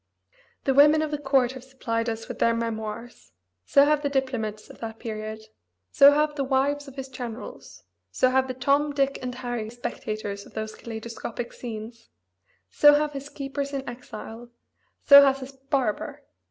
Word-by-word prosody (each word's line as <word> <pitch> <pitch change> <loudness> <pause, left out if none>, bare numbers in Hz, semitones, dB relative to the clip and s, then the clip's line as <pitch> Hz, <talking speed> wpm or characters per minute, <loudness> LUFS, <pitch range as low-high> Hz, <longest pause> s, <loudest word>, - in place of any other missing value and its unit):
The 270 - +2
women 300 +3 +6
of 310 - -3
the 295 - -2
court 270 -3 +2
have 260 -1 -10
supplied 235 -3 -3
us 225 0 -5
with - - -7
their 230 0 +3
memoirs; 230 +1 -5 0.3
so 280 - +6
have 300 0 +2
the 285 - -1
diplomats 250 -6 -2
of - - -14
that 225 -1 -6
period; 220 -1 -6 0.5
so 280 +1 +8
have 300 +1 +2
the 285 -2 -2
wives 280 +2 0
of 270 - -11
his 270 -1 -6
generals; 245 -3 -8 0.3
so 255 - +2
have 265 0 +2
the 255 - -4
Tom 285 +3 +1
Dick 275 -1 0
and 250 -1 -4
Harry 240 -3 -4
spectators 215 -3 -5
of - - -20
those 220 0 -4
kaleidoscopic 230 +1 -7
scenes; 230 0 -8 0.6
so 295 0 +7
have 300 0 +1
his 280 +1 -7
keepers 280 0 -5
in 270 -1 -4
exile; 240 -1 -9 0.6
so 280 0 +10
has 275 -1 +2
his 260 +1 -7
barber. 270 -4 -2
260 Hz, 170 wpm, -26 LUFS, 230-280 Hz, 0.6 s, so